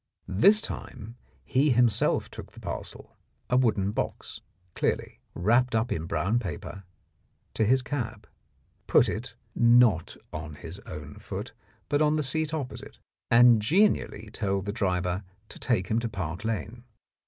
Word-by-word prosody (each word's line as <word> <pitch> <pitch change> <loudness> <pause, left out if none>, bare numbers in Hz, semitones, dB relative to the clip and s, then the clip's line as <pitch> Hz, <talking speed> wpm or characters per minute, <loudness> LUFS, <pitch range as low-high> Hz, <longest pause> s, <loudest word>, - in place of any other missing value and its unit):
This 115 - +5
time 115 - -7 0.3
he 140 +3 +2
himself 120 -4 +3
took - - -10
the - - -13
parcel, - - -7 0.4
a - - +4
wooden 110 -6 +2
box, - - -4 0.3
clearly, - - -2 0.2
wrapped 120 +6 +2
up 110 +2 0
in 80 0 -2
brown 90 +9 0
paper, 100 -5 -7 0.7
to 110 - +1
his 130 +4 +3
cab, 115 -6 -4 0.6
put - - +5
it, - - -5 0.2
not 115 -7 +4 0.2
on 75 0 -6
his 85 +5 -9
own 75 0 -8
foot, - - -6 0.3
but 145 0 +1
on 150 0 +3
the 155 - +1
seat 155 +3 0
opposite, 150 -5 -6 0.3
and 120 -1 +6
genially 125 - +1
told 100 -3 -1
the 100 - -3
driver 90 -3 -1 0.3
to - - -10
take 95 -7 0
him 110 - +2
to 115 0 -3
Park 90 -2 -5
Lane. 115 +1 -4
110 Hz, 145 wpm, -27 LUFS, 95-125 Hz, 0.7 s, and